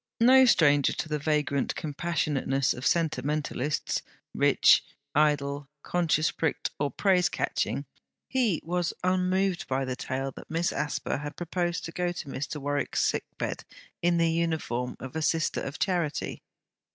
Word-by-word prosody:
No 260 Hz, +3 st, +7 dB
stranger 145 Hz, -, +4 dB
to -, -, -3 dB
the 150 Hz, -1 st, -1 dB
vagrant 145 Hz, -2 st, 0 dB
compassionateness 145 Hz, -4 st, 0 dB
of 125 Hz, -, -2 dB
sentimentalists; 150 Hz, -2 st, 0 dB, 0.3 s
rich, -, -, +5 dB, 0.3 s
idle, 145 Hz, -2 st, +1 dB
conscience 160 Hz, -3 st, +1 dB
pricked 160 Hz, -, -1 dB
or 145 Hz, 0 st, +1 dB
praise 185 Hz, +2 st, +2 dB
catching; -, -, -1 dB, 0.4 s
he 235 Hz, -10 st, +1 dB
was 175 Hz, 0 st, -1 dB
unmoved 185 Hz, 0 st, +1 dB
by 135 Hz, 0 st, 0 dB
the 130 Hz, -1 st, -3 dB
tale 135 Hz, +1 st, -3 dB
that -, -, -12 dB
Miss 165 Hz, +2 st, 0 dB
Asper 145 Hz, -, -2 dB
had 145 Hz, +1 st, -6 dB
proposed 175 Hz, 0 st, -2 dB
to 165 Hz, -, -6 dB
go 175 Hz, +1 st, -1 dB
to 165 Hz, -, -7 dB
Mr. 140 Hz, +3 st, -4 dB
Warwick's 145 Hz, 0 st, 0 dB
sick -, -, 0 dB
bed -, -, -3 dB, 0.4 s
in 175 Hz, 0 st, +3 dB
the 165 Hz, -1 st, +3 dB
uniform 160 Hz, -7 st, -1 dB
of 130 Hz, +2 st, -8 dB
a 160 Hz, -, -1 dB
Sister 165 Hz, +1 st, +1 dB
of 135 Hz, -, -5 dB
Charity. 175 Hz, -6 st, -1 dB
155 Hz, 145 wpm, -28 LUFS, 140-175 Hz, 0.4 s, No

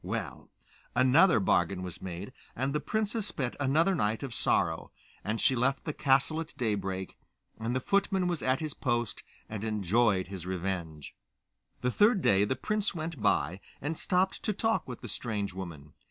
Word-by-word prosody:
Well, -, -, -4 dB, 0.5 s
another 130 Hz, +5 st, +6 dB
bargain 90 Hz, -1 st, +2 dB
was 90 Hz, -3 st, -7 dB
made, 95 Hz, +6 st, -6 dB, 0.2 s
and 135 Hz, +3 st, -1 dB
the 150 Hz, -, +1 dB
princess 215 Hz, +2 st, -1 dB
spent 130 Hz, -10 st, -2 dB
another 155 Hz, +7 st, +3 dB
night 110 Hz, -, 0 dB
of 135 Hz, -4 st, -4 dB
sorrow, -, -, +1 dB, 0.3 s
and 105 Hz, +4 st, -1 dB
she 130 Hz, -, +3 dB
left 130 Hz, +2 st, +1 dB
the 150 Hz, -, -2 dB
castle 140 Hz, +4 st, +2 dB
at 160 Hz, -, -9 dB
daybreak, 95 Hz, -5 st, -2 dB, 0.4 s
and 115 Hz, +3 st, -2 dB
the -, -, +2 dB
footman 195 Hz, +2 st, +1 dB
was 175 Hz, -3 st, -1 dB
at 130 Hz, +2 st, +1 dB
his 155 Hz, -2 st, -3 dB
post 120 Hz, -3 st, -1 dB, 0.3 s
and 110 Hz, -1 st, -5 dB
enjoyed 105 Hz, -1 st, +2 dB
his 95 Hz, -3 st, -6 dB
revenge. 85 Hz, -5 st, -4 dB, 0.7 s
The 125 Hz, -, +1 dB
third 210 Hz, -, +4 dB
day 100 Hz, +1 st, +5 dB
the 130 Hz, -, 0 dB
prince 210 Hz, -, -1 dB
went 160 Hz, -5 st, -4 dB
by, 90 Hz, -3 st, +2 dB, 0.2 s
and 150 Hz, +4 st, -2 dB
stopped 185 Hz, +3 st, +1 dB
to 215 Hz, -, 0 dB
talk 225 Hz, +3 st, 0 dB
with 125 Hz, -2 st, -7 dB
the -, -, -6 dB
strange 105 Hz, -5 st, -3 dB
woman. 85 Hz, -6 st, -8 dB
125 Hz, 170 wpm, -30 LUFS, 95-160 Hz, 0.7 s, another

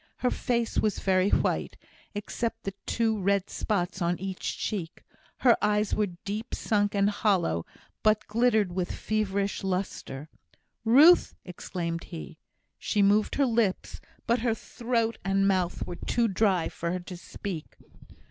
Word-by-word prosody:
Her 250 Hz, -, 0 dB
face 235 Hz, -2 st, 0 dB
was 215 Hz, -2 st, +1 dB
very 190 Hz, 0 st, +2 dB
white, -, -, 0 dB, 0.4 s
except 225 Hz, +2 st, -4 dB, 0.2 s
two 220 Hz, -3 st, +1 dB
red 200 Hz, 0 st, +1 dB
spots 190 Hz, -3 st, -2 dB
on 170 Hz, +1 st, +1 dB
each 190 Hz, 0 st, -4 dB
cheek 185 Hz, -6 st, -4 dB, 0.4 s
her 245 Hz, -3 st, +6 dB
eyes 210 Hz, 0 st, +1 dB
were 205 Hz, -5 st, 0 dB
deep 210 Hz, +4 st, -3 dB
sunk 205 Hz, -2 st, 0 dB
and 200 Hz, 0 st, +3 dB
hollow, 190 Hz, -, +1 dB, 0.3 s
but 215 Hz, 0 st, +3 dB
glittered 220 Hz, -3 st, +2 dB
with 180 Hz, 0 st, -2 dB
feverish 200 Hz, -2 st, -1 dB
lustre. 180 Hz, -7 st, -3 dB, 0.6 s
"Ruth!" 285 Hz, +10 st, +6 dB
exclaimed 170 Hz, -2 st, -4 dB
he. 165 Hz, -, -9 dB, 0.4 s
She 205 Hz, -2 st, +1 dB
moved 205 Hz, +2 st, +3 dB
her 280 Hz, -, +3 dB
lips, 225 Hz, -6 st, 0 dB, 0.2 s
but 235 Hz, +1 st, +2 dB
her 230 Hz, -1 st, +1 dB
throat 230 Hz, -1 st, -2 dB
and 195 Hz, 0 st, +2 dB
mouth 185 Hz, -3 st, 0 dB
were 175 Hz, -, -6 dB
too 235 Hz, -1 st, +1 dB
dry 190 Hz, -4 st, +2 dB
for 170 Hz, 0 st, -4 dB
her 185 Hz, -, -2 dB
to 180 Hz, +1 st, -8 dB
speak. 175 Hz, -1 st, -7 dB
200 Hz, 140 wpm, -28 LUFS, 185-225 Hz, 0.6 s, her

